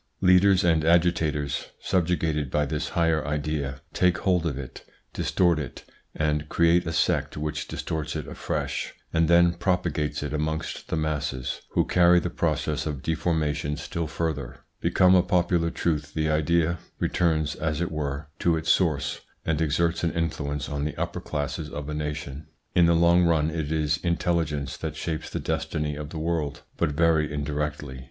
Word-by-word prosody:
Leaders 90 +1 +5
and 80 -3 +3
agitators, 80 -4 +2
subjugated 80 -5 0
by 75 +3 +1
this 75 +2 -2
higher 80 -3 +3
idea, 75 -2 -2
take 90 0 +3
hold 90 -4 +1
of 70 -5 -2
it, 70 -2 -8 0.3
distort 85 -3 +2
it 70 -5 -6 0.3
and 75 -1 0
create 85 0 +3
a - - -1
sect 80 - +1
which 75 -1 -3
distorts 80 -2 -4
it - - -3
afresh, - - -3 0.2
and 80 0 +3
then 85 +1 +5
propagates 85 -5 -1
it 75 0 -4
amongst 80 +1 -3
the - - -1
masses, 70 -5 -2
who - - +3
carry 90 0 +5
the 90 0 -3
process 75 -1 -1
of 70 -4 -4
deformation 75 -3 0
still 85 +2 -3
further. 70 -5 -3 0.2
Become 90 0 +4
a 90 - +7
popular 85 -2 +1
truth 75 -3 -2
the 80 0 +1
idea 85 +2 +2 0.2
returns, 80 -4 +1
as 75 -1 -2
it 85 -1 -1
were, 75 -1 -3
to 85 -2 +2
its 80 0 +1
source 80 -7 +1 0.2
and 80 -1 0
exerts 85 +3 +1
an 85 - +1
influence 75 -4 -2
on 70 0 -3
the 75 - -3
upper - - -3
classes 75 +1 -3
of 75 -1 -6
a - - -3
nation. 75 -1 -4 0.3
In 85 -2 +5
the 85 - +4
long 85 +1 +5
run 80 -2 +2
it 80 -2 -3
is 75 -1 +1
intelligence 80 -5 -1
that 80 -1 -4
shapes 80 0 -4
the - - -3
destiny 75 -1 -2
of 75 0 -6
the 80 - -7
world, 80 -3 -2
but - - 0
very 80 -1 +3
indirectly. 75 -2 -3
80 Hz, 165 wpm, -26 LUFS, 75-85 Hz, 0.3 s, a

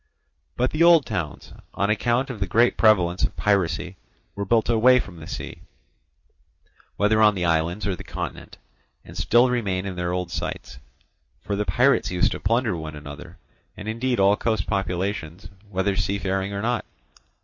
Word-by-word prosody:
But 125 - +1
the 155 - -2
old 170 -3 +6
towns, 90 -9 -5 0.2
on 100 +1 +1
account 120 +5 0
of 115 - -8
the 95 - -1
great 115 +6 +3
prevalence 95 -5 +3
of - - 0
piracy, 90 -3 0 0.4
were 100 - -4
built 115 +2 +2
away 120 +2 +5
from 95 -7 -7
the 80 - -10
sea, - - -7 1.4
whether 110 +1 +3
on 105 -1 +5
the 90 -2 -1
islands 85 +4 0
or 100 -2 -1
the - - -10
continent, - - -7 0.5
and 85 - -12
still 120 +8 +4
remain 100 -6 -1
in 95 -2 -5
their 90 0 -2
old 90 -1 -3
sites. 65 - -5 0.6
For 100 - -3
the 105 +1 -1
pirates 130 +6 +2
used 90 -1 +1
to - - -4
plunder 115 -1 +1
one 80 -2 -6
another, 75 -1 -10 0.4
and 105 - -8
indeed 120 +2 -1
all 100 +1 +5
coast 110 -3 -1
populations, 95 -2 -3 0.2
whether 95 +1 0
seafaring 95 0 -1
or 100 +1 -4
not. 120 0 0
100 Hz, 170 wpm, -24 LUFS, 90-115 Hz, 1.4 s, old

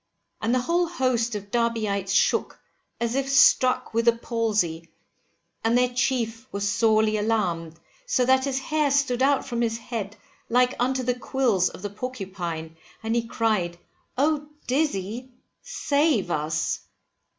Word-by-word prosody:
And 225 - 0
the 255 - +2
whole 340 +6 +1
host 255 -8 0
of 200 -1 -7
Derbyites 215 -5 0
shook, - - +1 0.4
as 235 0 -1
if 275 +1 -1
struck 275 -3 +4
with 230 +1 +1
the 235 - +6
palsy, 210 -9 -1 0.7
and 225 +2 +3
their 250 0 +2
chief 245 -2 -1
was 200 0 -2
sorely 215 0 +3
alarmed, 180 -7 -1 0.3
so 255 - +2
that 260 +1 +3
his 270 -2 -1
hair 300 +2 0
stood 270 -3 +1
out 275 +1 +3
from 240 -3 -2
his 225 -1 0
head 225 -3 -5 0.3
like 250 +1 +3
unto 255 +1 +1
the 250 0 +1
quills 245 -7 +1
of - - -12
the 205 - -4
porcupine, 185 -9 -5 0.3
and 225 +1 -1
he 230 -1 0
cried, 210 -8 0 0.4
Oh, 295 +2 +1 0.2
Dizzy, 250 -4 -1 0.3
save 285 - +1
us! 155 0 -1
235 Hz, 145 wpm, -25 LUFS, 205-260 Hz, 0.7 s, the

